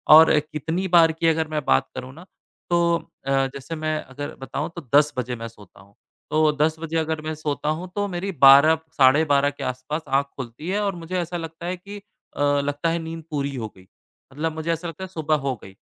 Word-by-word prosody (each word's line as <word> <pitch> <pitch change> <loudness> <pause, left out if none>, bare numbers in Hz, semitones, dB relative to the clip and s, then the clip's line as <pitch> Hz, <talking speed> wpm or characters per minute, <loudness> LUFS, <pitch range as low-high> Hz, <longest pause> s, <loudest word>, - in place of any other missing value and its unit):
और 160 -1 +8
कितनी 155 +5 -3
बार 165 -1 +7
की 165 +1 -1
अगर 160 0 +2
मैं 155 -1 -3
बात 65 - +3
करँ 130 0 -6
ना 170 +5 -13 0.4
तो 170 -1 +3 0.3
अ, - - 0 0.2
जैसे 140 +4 -6
मैं 155 0 -1
अगर 140 +2 -7
बताऊँ 140 +3 -4
तो 170 - -6
10 150 0 +5
बजे 125 0 -2
मैं 115 0 -6
सोता 105 -4 -16
हूँ। 100 +1 -22 0.4
तो 155 0 +4
10 155 +1 +3
बजे 165 0 -3
अगर 160 -1 -1
मैं 155 0 -4
सोता 150 -1 -3
हूँ 180 +1 -7
तो 205 0 0
मेरी 190 +1 -3
12 140 +4 +8 0.2
साढ़े 140 +3 +6
12 145 -1 +3
के 145 - -8
आसपास 130 +5 -3
आँख 135 +1 +2
खुलती 130 +6 -7
है 205 +2 0
और 200 -2 -1
मुझे 170 +2 -5
ऐसा 175 0 -3
लगता 165 +1 -7
है 180 +1 -2
कि 200 +3 -10 0.4
अ, - - -2
लगता 145 +2 +1
है 170 +1 0
नींद 165 0 -7
पूरी 140 -2 -2
हो 110 -3 -4
गई। 95 0 -18 0.5
मतलब 160 +3 -2
मुझे 160 +1 -2
ऐसा 170 +2 -5
लगता 165 +3 -7
है - - -5
सुबह 160 -4 0
हो 130 - 0
गई 95 0 -12
155 Hz, 225 wpm, -23 LUFS, 140-165 Hz, 0.5 s, और